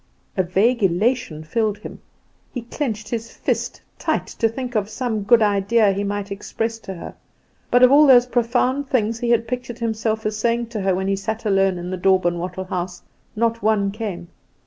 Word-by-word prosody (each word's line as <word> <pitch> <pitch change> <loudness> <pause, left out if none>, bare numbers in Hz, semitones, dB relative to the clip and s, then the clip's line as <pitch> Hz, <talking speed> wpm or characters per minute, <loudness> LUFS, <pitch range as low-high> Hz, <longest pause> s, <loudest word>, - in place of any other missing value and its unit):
A 190 - +3
vague 205 +7 +2
elation 195 -2 +1
filled 210 +6 -1
him. - - -10 0.5
He 245 - -5
clinched 225 -4 -4
his 230 -1 -4
fist - - -2 0.2
tight - - 0
to 225 - -1
think 250 +2 -5
of 210 -2 0
some 225 -2 -2
good 230 +2 +5
idea 205 +1 +3
he 200 +1 -2
might 205 0 -3
express 225 +3 -3
to 195 -3 -7
her; 170 - -8 0.6
but 245 +1 +4
of 255 - +7
all 295 +1 +7
those 245 -2 +7
profound 250 +3 0
things 225 -2 0
he 240 - -1
had 230 -1 +2
pictured 245 -1 -4
himself 220 -1 -2
as 215 0 -1
saying 235 +1 0
to 220 -3 -4
her, 190 -1 +1
when 190 +1 -2
he 195 - +2
sat 220 +3 -4
alone 195 -2 +2
in 175 +1 -5
the 185 - -2
daub 190 0 +3
and 175 0 +1
wattle 180 +2 -4
house, 180 -1 -4 0.3
not 230 +1 0
one 205 -2 +2
came. 195 -5 -5
215 Hz, 195 wpm, -21 LUFS, 195-235 Hz, 0.6 s, of